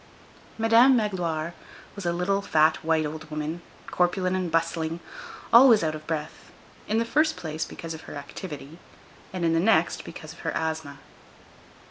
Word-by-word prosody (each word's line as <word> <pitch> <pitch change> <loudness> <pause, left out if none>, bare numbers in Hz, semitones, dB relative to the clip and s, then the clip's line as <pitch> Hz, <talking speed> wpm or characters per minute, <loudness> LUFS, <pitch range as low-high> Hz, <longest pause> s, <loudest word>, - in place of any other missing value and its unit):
Madame 230 +4 +6
Magloire 175 -7 -1 0.4
was 200 -4 -5
a - - +2
little, 180 +3 0
fat, 155 -4 +3
white 160 -1 +2
old 155 +1 -6
woman, 155 +2 -4 0.3
corpulent 185 +1 +1
and 185 -3 -2
bustling; 165 0 -1 0.5
always 235 -4 +8
out 155 -1 0
of 155 0 -9
breath,—in 160 +6 -5
the 230 - +1
first 310 +4 +2
place, 160 -3 -4
because 165 -1 -7
of 160 - -9
her - - -8
activity, 145 +1 -8 0.5
and 185 -2 -2
in 165 - +2
the 165 - +3
next, 220 +6 +2
because - - -9
of - - -17
her - - -3
asthma. 160 -3 -3
165 Hz, 155 wpm, -26 LUFS, 155-195 Hz, 0.5 s, always